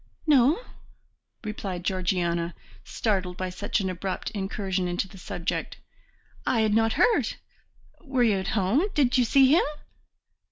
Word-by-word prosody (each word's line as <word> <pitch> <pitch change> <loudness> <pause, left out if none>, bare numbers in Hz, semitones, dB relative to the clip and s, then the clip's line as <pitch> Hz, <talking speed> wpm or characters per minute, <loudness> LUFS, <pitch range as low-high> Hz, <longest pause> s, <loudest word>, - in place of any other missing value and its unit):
"No," 290 - +5 0.8
replied 195 -4 -5
Georgiana, 175 -2 -1 0.3
startled 190 -5 -1
by 185 -1 -3
such 205 +3 -1
an 190 - -1
abrupt 185 +1 -3
incursion 190 -2 -2
into 175 +2 -2
the 190 - -14
subject. 175 -1 -4 0.7
"I 230 - +1
had 215 -1 +2
not 225 0 +3
heard. 470 - +2 0.7
Were 265 -4 +1
you 215 -4 +3
at 190 - -4
home? 205 - +2
Did 260 -3 +3
you 245 - +4
see 270 +3 +5
him?" 330 - +5
195 Hz, 135 wpm, -26 LUFS, 185-240 Hz, 0.8 s, No